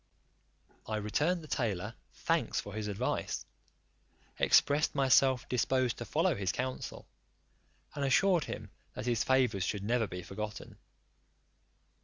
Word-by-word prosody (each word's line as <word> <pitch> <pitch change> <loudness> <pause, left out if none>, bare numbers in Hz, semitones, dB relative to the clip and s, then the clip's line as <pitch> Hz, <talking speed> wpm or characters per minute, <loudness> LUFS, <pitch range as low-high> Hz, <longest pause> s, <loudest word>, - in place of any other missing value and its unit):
I 110 - -2
returned 150 - 0
the - - -10
tailor 110 -10 -2 0.2
thanks - - 0
for 100 - -7
his 105 -1 -3
advice, 100 -1 -2 0.9
expressed 145 +1 +4
himself 135 -2 +4
disposed 125 0 +1
to - - -4
follow - - +2
his 95 -3 -1
counsel, 130 0 -4 0.9
and 145 - -3
assured 170 +4 +3
him 105 -2 -7 0.2
that - - -5
his 120 -3 +1
favours 125 -7 +2
should 100 +1 -2
never 115 +1 +1
be 90 -1 -6
forgotten. 105 +3 -7
120 Hz, 125 wpm, -32 LUFS, 105-135 Hz, 0.9 s, expressed